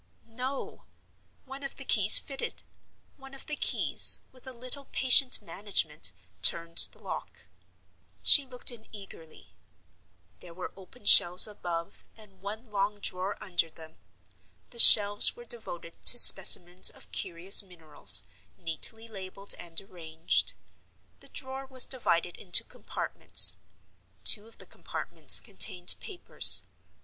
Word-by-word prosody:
No! 255 +4 -10 0.6
One 270 +1 -12
of 275 - -9
the 275 - -11
keys 210 -4 +5
fitted; 270 -1 -7 0.5
one 270 -1 -16
of 270 - -8
the 300 - -5
keys, - - 0
with 260 0 -21
a - - -7
little 255 +3 -6
patient 260 0 +4
management, 170 -4 -4 0.3
turned 165 0 +1
the - - -18
lock. - - -12 0.8
She 285 - +5
looked 255 -1 -3
in 230 -2 -15
eagerly. 195 -6 -16 0.9
There 170 - -17
were 180 - -11
open 195 +6 -20
shelves 175 +1 +5
above, 175 -5 -10
and 195 -4 -18
one 215 +3 -12
long 205 +1 -5
drawer 185 0 -6
under 175 -4 -5
them. 160 0 -14 0.7
The 235 - -9
shelves 205 -2 +7
were 240 - -16
devoted 175 -8 -11
to 245 - +4
specimens 180 -4 +6
of - - -17
curious 185 +1 0
minerals, 165 -6 +1 0.3
neatly 175 +7 -3
labeled 195 -1 -5
and 165 -1 -5
arranged. 165 -4 -5 0.7
The - - -15
drawer 265 0 -9
was 260 -1 -2
divided 175 -9 -5
into 180 -3 +3
compartments. - - -2 0.6
Two 210 0 +4
of 230 - -16
the - - -9
compartments - - -2
contained 180 -4 -1
papers. 380 -4 0
205 Hz, 130 wpm, -25 LUFS, 175-250 Hz, 0.9 s, shelves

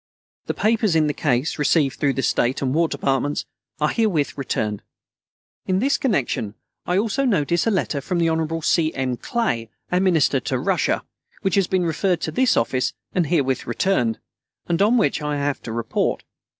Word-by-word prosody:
The - - -2
papers 215 -4 +2
in 155 -1 +4
the 150 - 0
case, 140 +1 0
received 145 -2 +2
through 140 -2 +2
the 135 - -2
State 125 +3 +1
and 130 -1 0
War 165 +2 +3
Departments, 140 0 -1 0.3
are 150 0 +2
herewith 195 -11 0
returned. 110 -6 -2 0.9
In 185 - +2
this 275 +7 +1
connection, 130 - -1 0.3
I 180 - +1
also 225 +6 +1
notice 175 - +1
a - - +5
letter 175 -8 0
from 180 +6 -2
the 170 -1 +2
Hon. 160 0 -1
C. 160 -1 +2
M. 130 -2 -1
Clay, 120 - -2 0.2
our 180 - +3
Minister 180 -6 +3
to - - -2
Russia, - - 0 0.4
which 195 - 0
has 195 -3 +3
been 185 -2 +1
referred 170 +3 0
to 160 - -2
this 255 +8 +2
office 125 +2 0 0.2
and 175 -4 +1
herewith 140 -5 0
returned, 120 -3 +1 0.5
and 170 +2 0
on 220 +5 +4
which 155 -8 +1
I 150 0 -2
have 140 0 -1
to 115 - -7
report. 115 0 -1
160 Hz, 180 wpm, -22 LUFS, 135-190 Hz, 0.9 s, a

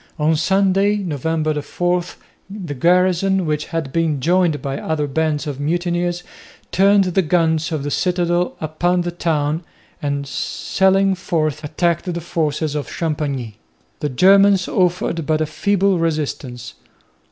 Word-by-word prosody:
On 155 +1 +2
Sunday, 195 +4 +2
November 155 -4 -1
4, 175 +4 -1 0.5
the 190 -7 -6
garrison, 180 +5 +2
which 150 -1 -1
had 160 -5 -4
been 160 -4 +1
joined 170 +1 +2
by 135 +1 -4
other 155 -2 -1
bands 155 +1 -1
of 145 -3 -5
mutineers, 175 +3 -1 0.5
turned 200 +1 +4
the 185 +1 +1
guns 160 -1 +1
of 155 -3 -2
the 145 - -3
citadel 175 0 0
upon 175 +3 0
the 175 0 -3
town 160 -2 -1 0.4
and 140 -1 -2
sallying 190 +8 +1
forth 155 -5 -2
attacked 170 +4 -1
the 170 - -3
forces 160 -3 -2
of 150 -1 -4
Champagney. 140 -9 -3 0.4
The 150 - -2
Germans 195 +6 +5
offered 175 -3 0
but 155 -1 +2
a 155 - +1
feeble 195 +3 +1
resistance. 145 -7 -3
165 Hz, 135 wpm, -19 LUFS, 150-180 Hz, 0.5 s, Germans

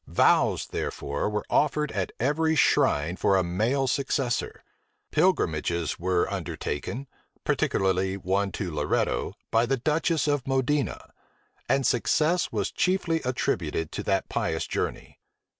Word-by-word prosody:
Vows, - - +3
therefore, 70 +8 -3
were 105 0 -2
offered 150 0 +1
at 95 -3 -2
every 160 +5 +1
shrine 85 - +3
for 95 - +3
a 95 - +2
male 110 +11 0
successor: 135 -1 -1 0.5
pilgrimages 85 - +1
were 90 0 +1
undertaken, 120 - -4 0.4
particularly 95 0 +1
one 95 +1 0
to 90 -4 -3
Loretto, 75 -1 0 0.2
by 115 +1 +3
the 135 +2 +1
duchess 155 +4 +1
of 145 -2 0
Modena; 135 +2 0 0.6
and 135 -1 +2
success 155 +8 +2
was - - -1
chiefly 180 -3 +1
attributed 120 -9 -1
to - - -4
that - - 0
pious 80 0 -1
journey. - - -4
120 Hz, 125 wpm, -26 LUFS, 90-145 Hz, 0.6 s, Vows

